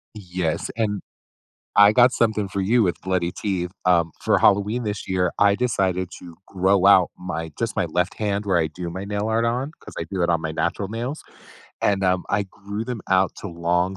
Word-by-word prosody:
Yes. 90 -5 -3
And 105 -3 -1 0.8
I 100 0 +8
got 125 +2 +5
something 110 -3 +1
for 100 - -3
you 115 +5 +3
with 90 -5 +1
bloody 90 -2 0
teeth, 90 -2 -3
um, 85 -2 +3
for - - +2
Halloween 105 +4 +3
this 105 -3 -4
year, 90 -1 +1
I 100 0 +5
decided 95 -7 0
to 85 -2 -12
grow 95 0 +2
out 95 -3 +6
my 80 -3 -5
just 115 -1 -2
my - - +2
left 85 +2 -1
hand 105 -1 -2
where 95 -3 +2
I 80 - +2
do 85 +3 -6
my 95 +3 -5
nail 105 +1 -2
art 115 +1 +1
on, 125 +5 -1
'cause - - -12
I 85 - -2
do 95 -3 -1
it 85 - +1
on 85 -2 +2
my 80 - -3
natural 85 +5 -2
nails. 120 +8 -4 0.6
And, 100 -1 +2
um, 90 -1 +1
I 100 0 +1
grew 100 +3 -6
them 120 -4 -4
out 95 0 +3
to - - -7
long 90 +2 0
95 Hz, 205 wpm, -23 LUFS, 90-105 Hz, 0.8 s, I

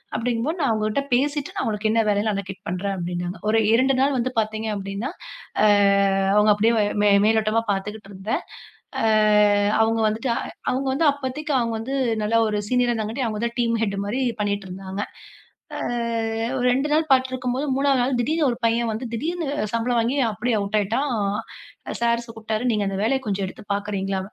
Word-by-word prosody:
அப்பிடிங்கம்போது 245 +8 -1
நான் 280 - +2
அவுங்ககிட்ட 215 +4 0
பேசிட்டு 285 +3 0
நான் - - -1
உனக்கு 215 0 -1
என்ன 225 +1 +3
வேலைன்னு 205 +1 +1
அலகேட் 195 -1 -6
பண்றேன் 195 +3 -2
அப்பிடின்னாங்க. 175 0 -4
ஒரு 225 - +4
2 260 +4 +4
நாள் 275 0 +2
வந்து 250 +1 -1
பார்த்தீங்க 220 0 -2
அப்பிடின்னா, 200 +5 -4 0.5
அ - - +6 0.7
அவுங்க 210 0 +5
அப்பிடியே 220 +3 +3 0.3
மே 205 - +5 0.2
மேலோட்டமா 220 0 +2
பாத்துக்கிட்டு 205 +1 -4
இருந்தேன். 190 +3 -3 0.6
அ - - +3 0.8
அவுங்க 225 0 +2
வந்துட்டு 225 +4 -1
அ - - -1 0.3
அவுங்க 265 +1 -1
வந்து 310 +3 +2
அப்பத்தைக்கு 285 +2 -4
அவுங்க 230 -1 -1
வந்து 260 +5 -4 0.3
நல்ல 215 +2 0
ஒரு 210 -1 -1
சீனியரா 250 -1 +2
இருந்தங்காட்டி 225 +3 -2
அவுங்க 215 -1 -3
தான் 235 +2 -10
டீம் 230 -1 +1
ஹெட்மாரி 200 +4 -2 0.2
பண்ணிட்டு 200 -1 -2
இருந்தாங்க. 190 +2 -5 0.7
அ - - -4 0.8
ஒரு 250 - -1
2 270 +4 0
நாள் 310 +1 +3
பார்த்துட்டு 260 -1 +3
இருக்கும்போது 255 +2 -2
3வது 275 -1 +2
நாள் 255 0 0
திடீர்னு 305 +5 +1
ஒரு 235 - -4
பையன் 230 0 +1
வந்து 220 +4 -4
திடீர்னு 330 +8 -2 0.3
சம்பளம் 230 +1 +1
வாங்கி 240 +5 0
அப்படியே 225 +3 -1
அவுட் 200 +1 -2
ஆயிட்டான். 235 +8 -1 0.8
அ - - -3
சார் 235 0 +2
கூப்பிட்டாரு. 225 -1 -4
"நீங்க 210 -2 0
அந்த 195 - -2
வேலைய 265 +4 +2
கொஞ்சம் 195 -1 -1
எடுத்துப் 205 +2 -9
பாக்குறீங்களா?" 200 -1 -2
225 Hz, 175 wpm, -23 LUFS, 205-255 Hz, 0.8 s, அ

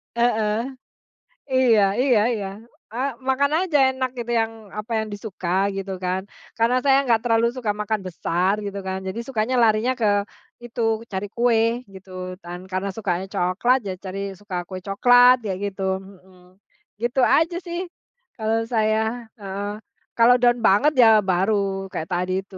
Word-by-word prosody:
Heeh. 220 -3 +1 1.0
Iya 245 -5 +4 0.2
iya 245 -6 +4
iya. 200 -3 -4 0.5
Eee, 260 +4 -1 0.2
makan 280 +2 +2
aja 340 -6 +1 0.2
enak, 260 -1 -2
gitu, 240 0 -4
yang, 225 0 -1 0.3
apa, 215 +3 -5
yang 220 - -2
disuka, 195 -4 -6 0.3
gitu 195 0 -4
kan. 185 +1 -1 0.4
Karena 235 +2 +3
saya 270 -1 +4
enggak 230 -2 +3
terlalu 230 -1 +2
suka 240 -5 -2
makan 210 0 -2
besar, 180 +2 0
gitu 200 0 -5
kan, 190 0 -2
jadi 190 +5 -4
sukanya, 245 -1 -1
larinya 220 +3 +3
ke 215 - +2 0.6
itu, 235 0 -4 0.3
cari 190 +2 -2
kue, 235 0 +2 0.3
gitu 190 0 -13 0.3
kan. 175 +1 -7
Karena 190 +1 -2
sukanya 190 -3 -2
coklat, 185 +9 +2
ya 190 - -2
cari, 190 +1 -5 0.2
suka 200 -3 -6
kue 185 - -6
coklat, 245 +5 +6
kayak 190 -2 -2
gitu. 195 0 -8 0.2
Heeh. 190 -1 -17 0.6
Gitu 245 +3 +1
aja 330 +7 +3
sih, 345 0 -4 0.6
kalau 220 0 0 0.2
saya. 215 0 +2 0.4
Heeh. 200 0 -5 0.5
Kalau 235 +2 +7
down 240 0 +4
banget, 230 +11 +4
ya 225 - +8 0.2
baru 195 +1 0
kayak 160 -4 -4
tadi 180 +1 -1
itu. 195 -1 -15
215 Hz, 155 wpm, -23 LUFS, 190-240 Hz, 1.0 s, ya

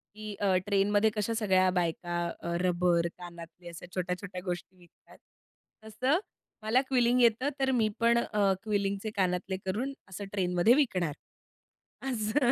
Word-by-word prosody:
की 215 -1 -6
अ, 195 -2 +2
ट्रेनमध्ये 205 +1 +3
कशा 210 +2 -1
सगळ्या 190 -4 +3
बायका 175 0 -1 0.3
अ, 170 0 -3
रबर 175 -1 +2
कानातले 175 0 -11
अशा 170 +1 -9
छोट्या-छोट्या 180 +1 -3
गोष्टी 180 +1 -5
विकतात. 175 -1 -20 0.7
तसं 255 +9 +1 0.4
मला 230 +4 +3
क्विलिंग 250 -1 +3
येतं. 235 +4 +3
तर 265 0 +2
मी 225 -4 +2
पण 235 0 +4
अ, 205 -4 +2
क्विलिंगचे 200 0 -1
कानातले 185 0 0
करून 240 +9 -2 0.2
असं 195 +2 -6
ट्रेनमध्ये 180 +3 +3
विकणार. 185 - +1 1.0
असं 240 +2 +1
200 Hz, 135 wpm, -30 LUFS, 180-225 Hz, 1.0 s, पण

